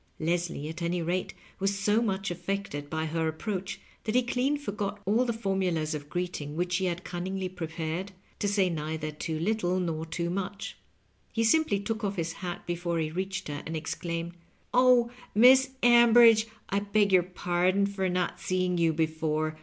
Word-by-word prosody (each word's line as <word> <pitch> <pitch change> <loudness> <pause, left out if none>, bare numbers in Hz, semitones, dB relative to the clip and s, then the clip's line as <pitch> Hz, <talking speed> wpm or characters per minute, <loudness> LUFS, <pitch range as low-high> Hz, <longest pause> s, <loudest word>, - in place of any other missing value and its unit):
Leslie, 170 -2 -1
at 160 +2 -7
any 170 +1 0
rate, 175 +2 -2 0.2
was 195 +1 0
so 210 +3 +2
much 195 -4 -1
affected 175 -5 -4
by 160 +1 -2
her 160 +1 -1
approach 185 +4 -4 0.3
that 215 +1 -1
he 250 - +5
clean 255 +4 0
forgot 205 -7 -4
all 220 +6 +3
the 240 - 0
formulasof 175 -9 -1
greeting 175 -5 -3
which 175 +1 0
he 190 - 0
had 175 0 -2
cunningly 185 +2 -3
pi'epared 165 0 -4 0.3
to 205 - 0
say 200 -2 +2
neither 155 -2 -3
too 155 +1 -4
little 185 -1 0
nor 165 -3 -2
too 170 +1 -3
much. 195 +2 -4 0.6
He 225 - 0
simply 225 -3 +3
took 220 +2 -3
off 200 -1 -1
his 165 -2 -2
hat 175 0 -6
before 175 0 -2
he 155 -1 -1
reached 190 +3 -3
her, 145 -1 -4
and 160 0 -4
exclaimed, 170 +1 -4 0.4
"Oh, 250 -1 +5 0.2
Miss 260 +4 +7
Ambridge, 235 -2 +7 0.2
I 200 - +1
beg 205 0 +2
your^ 180 -1 +3
pardon 180 +3 +2
for 195 -2 -1
not 180 0 -1
seeing 185 -1 0
you 165 -1 +3
before. 155 0 -1
180 Hz, 170 wpm, -28 LUFS, 165-205 Hz, 0.6 s, Miss